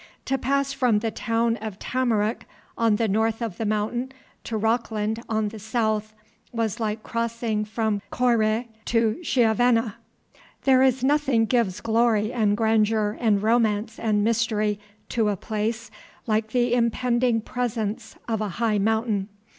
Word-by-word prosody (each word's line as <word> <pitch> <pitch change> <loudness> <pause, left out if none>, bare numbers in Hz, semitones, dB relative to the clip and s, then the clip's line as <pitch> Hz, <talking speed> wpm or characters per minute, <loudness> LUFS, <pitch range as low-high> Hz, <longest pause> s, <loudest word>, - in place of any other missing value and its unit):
To 270 - 0
pass 275 +2 0
from 250 -5 +2
the 220 +1 -1
town 230 +1 0
of 215 -2 -6
Tamarack 230 -4 -1 0.3
on 225 -2 +2
the 225 +1 +1
north 220 +2 +1
of 225 -7 -4
the 225 - -2
mountain 220 +5 -1 0.3
to 225 - -2
Rockland 220 0 -1
on 220 -1 0
the 220 +1 -9
south 215 -1 -1 0.4
was 230 -1 -2
like 215 -1 -2
crossing 230 -2 -2
from 215 -1 -1
Coire 235 -2 +1 0.2
to 230 +2 +1
Chiavenna. 235 - +2 0.7
There 260 -1 +5
is 260 -1 +3
nothing 275 -5 +3
gives 215 -5 0
glory 225 -1 +2
and 210 -4 +2
grandeur 220 -1 +2
and 210 -4 +2
romance 220 -1 +1
and 210 -2 +1
mystery 215 -2 +1 0.3
to 225 -3 +1
a 205 - -1
place 220 +3 -3 0.3
like 220 -1 0
the 240 +1 +1
impending 240 0 +2
presence 225 -2 -3
of 220 -2 -1
a 210 - -1
high 225 -3 +1
mountain. 220 -1 0
225 Hz, 145 wpm, -24 LUFS, 215-235 Hz, 0.7 s, There